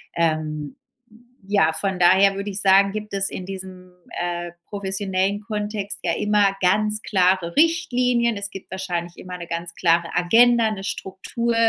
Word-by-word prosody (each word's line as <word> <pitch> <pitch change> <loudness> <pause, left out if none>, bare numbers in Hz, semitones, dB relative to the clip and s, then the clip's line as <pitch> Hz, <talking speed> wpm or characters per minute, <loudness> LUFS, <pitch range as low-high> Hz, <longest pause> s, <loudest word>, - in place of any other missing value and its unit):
ähm 155 -3 -1 0.7
ja 200 -6 +3
von 190 +3 -1
daher 190 +3 +5
würde 200 +1 -4
ich 200 +1 -1
sagen 195 0 +5
gibt 210 0 -6
es 195 0 +2
in 185 - -7
diesem, 185 -1 -8 0.3
äh, 175 -1 -3
professionellen 195 0 -1
Kontext 210 -1 -4
ja - - 0
immer 205 -2 +2
ganz 210 +3 +2
klare 185 -3 +1
Richtlinien. 250 -8 +2
Es 200 0 -4
gibt 195 - -11
wahrscheinlich 175 -2 -4
immer 180 0 -8
'ne 175 - -7
ganz 170 0 -5
klare 170 -1 +2
Agenda, 230 +5 +4
'ne 195 -2 -6
Struktur 200 +5 -3
195 Hz, 150 wpm, -22 LUFS, 180-210 Hz, 0.7 s, daher